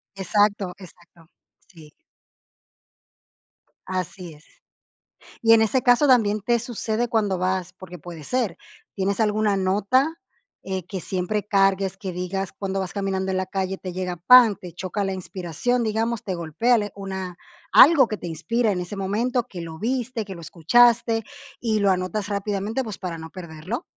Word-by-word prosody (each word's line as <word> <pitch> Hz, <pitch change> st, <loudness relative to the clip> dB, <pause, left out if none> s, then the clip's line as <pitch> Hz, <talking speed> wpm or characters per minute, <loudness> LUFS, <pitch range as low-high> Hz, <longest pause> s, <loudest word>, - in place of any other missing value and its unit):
Exacto, 200 Hz, 0 st, +1 dB
exacto. 175 Hz, -3 st, -17 dB, 0.4 s
Sí. 160 Hz, -5 st, -16 dB, 1.9 s
Así 180 Hz, -2 st, -5 dB
es. 150 Hz, +1 st, -19 dB, 1.0 s
Y 225 Hz, -, +6 dB
en 225 Hz, -1 st, +7 dB
ese 245 Hz, +3 st, +1 dB
caso 245 Hz, +4 st, +5 dB
también 215 Hz, -5 st, +4 dB
te 235 Hz, +2 st, +2 dB
sucede 235 Hz, 0 st, -2 dB
cuando 210 Hz, -5 st, 0 dB
vas, 185 Hz, 0 st, -1 dB
porque 180 Hz, -1 st, -11 dB
puede 165 Hz, -2 st, -10 dB
ser, 245 Hz, -8 st, -1 dB, 0.4 s
¿tienes 200 Hz, +2 st, -1 dB
alguna 210 Hz, -1 st, +2 dB
nota, 210 Hz, +11 st, +2 dB, 0.5 s
eh, 190 Hz, -2 st, -4 dB
que 190 Hz, 0 st, -5 dB
siempre 195 Hz, +4 st, -2 dB
cargues, 195 Hz, -1 st, +2 dB
que 190 Hz, -3 st, -5 dB
digas 180 Hz, +2 st, -3 dB
cuando 195 Hz, -1 st, -2 dB
vas 185 Hz, -2 st, -5 dB
caminando 190 Hz, -1 st, -1 dB
en 190 Hz, -, -1 dB
la 185 Hz, -, 0 dB
calle 190 Hz, 0 st, -2 dB
te 185 Hz, -1 st, -7 dB
llega, 180 Hz, -1 st, -3 dB
¡pam! 230 Hz, +3 st, +7 dB
Te 180 Hz, -2 st, -10 dB
choca 190 Hz, +3 st, -3 dB
la 195 Hz, -, -1 dB
inspiración, 190 Hz, +6 st, -2 dB
digamos, 225 Hz, +1 st, -1 dB
te 190 Hz, -, -2 dB
golpea, 180 Hz, +9 st, +1 dB
le 205 Hz, -1 st, -3 dB
una 190 Hz, -2 st, -6 dB, 0.4 s
algo 280 Hz, -4 st, +8 dB
que 215 Hz, -, -3 dB
te 175 Hz, -, -7 dB
inspira 210 Hz, +8 st, 0 dB
en 180 Hz, -, -2 dB
ese 180 Hz, +3 st, -6 dB
momento, 230 Hz, +6 st, -1 dB
que 185 Hz, -7 st, -8 dB
lo 160 Hz, -1 st, -7 dB
viste, 245 Hz, 0 st, -2 dB
que 195 Hz, -2 st, -8 dB
lo 170 Hz, -, -10 dB
escuchaste 230 Hz, +8 st, +3 dB, 0.4 s
y 220 Hz, -3 st, 0 dB
lo 200 Hz, -1 st, +3 dB
anotas 185 Hz, +2 st, -1 dB
rápidamente, 205 Hz, +4 st, -2 dB
pues, 215 Hz, -4 st, -7 dB
para 175 Hz, -3 st, -5 dB
no 160 Hz, 0 st, -9 dB
perderlo? 180 Hz, -, -6 dB
195 Hz, 165 wpm, -23 LUFS, 180-225 Hz, 1.9 s, algo